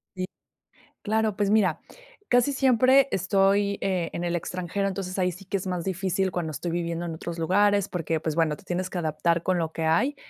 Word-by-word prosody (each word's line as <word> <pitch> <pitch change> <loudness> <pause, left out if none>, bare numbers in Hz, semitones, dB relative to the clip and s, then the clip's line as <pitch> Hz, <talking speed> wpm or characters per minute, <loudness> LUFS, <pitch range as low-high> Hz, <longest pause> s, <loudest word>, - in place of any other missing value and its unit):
Sí. 185 0 -2 0.8
Claro, 220 -1 0
pues 205 -1 +1
mira, 200 -7 +3 0.5
casi 245 +3 +3
siempre 260 0 +4
estoy, 195 +2 +2
eh, 180 -3 -1
en 175 - -4
el 175 0 -1
extranjero, 185 +3 -2
entonces, 190 -1 -4
ahí 180 -1 +1
sí 185 +3 -12
que 195 - -2
es 190 - -7
más 180 -2 -2
difícil 190 0 -1
cuando 175 -3 -3
estoy 155 +4 -4
viviendo 170 0 -2
en 165 - -4
otros 170 +1 -6
lugares, 200 +4 +3
porque, 165 -2 -2
pues 160 -1 -2
bueno, 160 -2 +1
te - - -18
tienes 185 0 -2
que 180 - -4
adaptar 165 +1 0
con 185 0 +1
lo 160 -1 -2
que 165 - -3
hay 170 - +2
185 Hz, 205 wpm, -26 LUFS, 170-200 Hz, 0.8 s, siempre